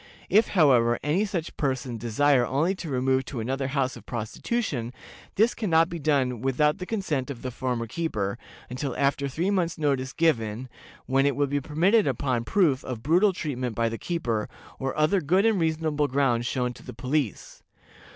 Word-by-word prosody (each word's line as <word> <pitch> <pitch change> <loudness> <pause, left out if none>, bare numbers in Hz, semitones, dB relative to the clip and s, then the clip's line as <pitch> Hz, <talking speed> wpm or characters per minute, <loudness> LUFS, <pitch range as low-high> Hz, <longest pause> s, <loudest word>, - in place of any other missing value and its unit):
If, 215 +3 +5
however, 120 -7 +5
any 170 +8 +1
such 175 -6 -4
person 130 -4 -2
desire 125 +4 +3
only 145 +9 +1
to 185 -4 -7
remove 130 0 +1
to 125 - -6
another 135 +4 -2
house 135 -2 -1
of 120 - -12
prostitution, 120 - -3 0.4
this 220 +4 +3
can 215 -4 -3
not 165 +1 +4
be 170 - -5
done 135 -6 +1
without 150 +6 +1
the 180 - -6
consent 155 - -2
of 130 -4 -7
her 130 - -3
former 125 -1 -2
keeper, 115 -6 -3 0.3
until 130 +1 -4
after 140 0 +1
three 165 +9 -1
months' 175 -4 0
notice 135 -4 0
given, 125 -7 0 0.4
when 135 +1 +2
it 140 - +1
will 145 - +2
be 145 +1 -1
permitted 180 - +2
upon 130 -2 -1
proof 150 - +2
of 120 -3 -6
brutal 180 +7 +4
treatment 130 - -4
by 115 +1 +1
the 115 - -5
keeper, 120 -11 -2 0.3
or 135 +2 -3
other 155 +6 +3
good 185 +7 +2
and 220 -4 +3
reasonable 155 -2 0
grounds 125 -3 +1
shown 125 -2 -1
to - - -15
the 125 - -9
police. 130 -2 -2
140 Hz, 180 wpm, -26 LUFS, 125-160 Hz, 0.4 s, If